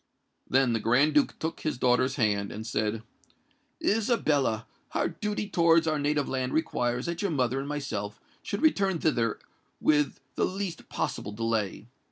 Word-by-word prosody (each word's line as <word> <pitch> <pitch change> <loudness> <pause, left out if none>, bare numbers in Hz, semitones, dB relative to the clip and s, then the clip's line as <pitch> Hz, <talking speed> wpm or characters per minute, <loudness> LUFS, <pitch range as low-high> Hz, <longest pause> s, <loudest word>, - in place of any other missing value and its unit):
Then 130 -2 +3
the 115 - +1
Grand 135 +8 +3
Duke 145 -1 +2
took 160 +1 -3
his 155 - -2
daughter's 125 +1 +2
hand, 105 -5 +1
and 110 +1 -6
said, 110 0 -1 0.8
"Isabella, 155 - +2 0.3
our - - +1
duty 210 0 -3
towards 165 -3 +4
our 155 -2 +1
native 145 0 +1
land 130 -1 -2
requires 125 -5 0
that 170 0 -3
your 200 - 0
mother 130 -4 +1
and 135 - -4
myself 105 -8 -4 0.2
should 200 - -4
return 195 - +3
thither 120 -9 +1 0.4
with 150 -2 +2
the - - +1
least 190 -3 -4
possible 105 - -3
delay. 110 -2 -1
140 Hz, 155 wpm, -28 LUFS, 115-165 Hz, 0.8 s, towards